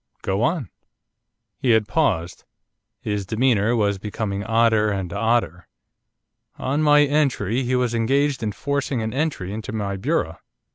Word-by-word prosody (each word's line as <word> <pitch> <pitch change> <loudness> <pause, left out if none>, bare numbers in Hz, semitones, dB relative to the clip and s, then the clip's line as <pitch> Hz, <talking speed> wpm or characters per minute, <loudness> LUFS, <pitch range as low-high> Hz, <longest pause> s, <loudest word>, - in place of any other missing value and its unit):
Go 95 +2 -1
on.' 135 - 0 0.9
He 130 - 0
had 110 -2 +2
paused. 90 - 0 0.6
His 105 -1 -2
demeanour 115 +1 +1
was 100 -3 +1
becoming 100 -1 -3
odder 115 -1 +3
and 95 -4 -3
odder. 105 -5 0 0.9
'On 140 +4 -1
my 150 -1 +6
entry 135 -6 +1
he 130 0 0
was 125 -2 0
engaged 135 +4 +1
in 110 -2 -1
forcing 140 +1 -2
an 110 - -3
entry 135 - -2
into 110 0 -5
my 100 -3 -3
bureau. 95 - -1
115 Hz, 140 wpm, -22 LUFS, 100-135 Hz, 0.9 s, my